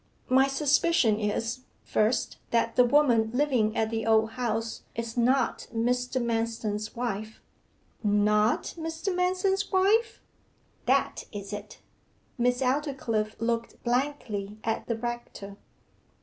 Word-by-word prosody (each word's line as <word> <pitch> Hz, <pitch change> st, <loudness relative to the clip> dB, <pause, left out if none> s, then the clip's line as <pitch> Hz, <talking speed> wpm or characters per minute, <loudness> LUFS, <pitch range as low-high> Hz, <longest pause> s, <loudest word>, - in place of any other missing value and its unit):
My 265 Hz, +1 st, +5 dB
suspicion 275 Hz, -5 st, +2 dB
is, 225 Hz, +3 st, -1 dB, 0.2 s
first, 215 Hz, +3 st, 0 dB
that 230 Hz, 0 st, +1 dB
the 250 Hz, -, +6 dB
woman 245 Hz, -4 st, +4 dB
living 250 Hz, -6 st, +1 dB
at 220 Hz, 0 st, +1 dB
the 225 Hz, -1 st, -2 dB
Old 220 Hz, 0 st, +4 dB
House 225 Hz, -2 st, -2 dB
is 230 Hz, 0 st, -4 dB
not 250 Hz, +1 st, +1 dB
Mr. 250 Hz, +2 st, 0 dB
Manston's 225 Hz, -2 st, -2 dB
wife.' 220 Hz, -2 st, -4 dB, 0.6 s
'Not 210 Hz, +1 st, +2 dB
Mr. 325 Hz, +3 st, -3 dB
Manston's 370 Hz, +2 st, 0 dB
wife?' 430 Hz, +4 st, +3 dB, 0.7 s
'That -, -, +1 dB
is 200 Hz, -1 st, -7 dB
it.' 205 Hz, 0 st, -8 dB, 0.6 s
Miss 245 Hz, +2 st, +2 dB
Aldclyffe 250 Hz, -6 st, -1 dB
looked 230 Hz, 0 st, -2 dB
blankly 240 Hz, -6 st, -2 dB
at 225 Hz, 0 st, -2 dB
the 230 Hz, -, -1 dB
rector. 240 Hz, -4 st, -6 dB
235 Hz, 115 wpm, -28 LUFS, 220-270 Hz, 0.7 s, the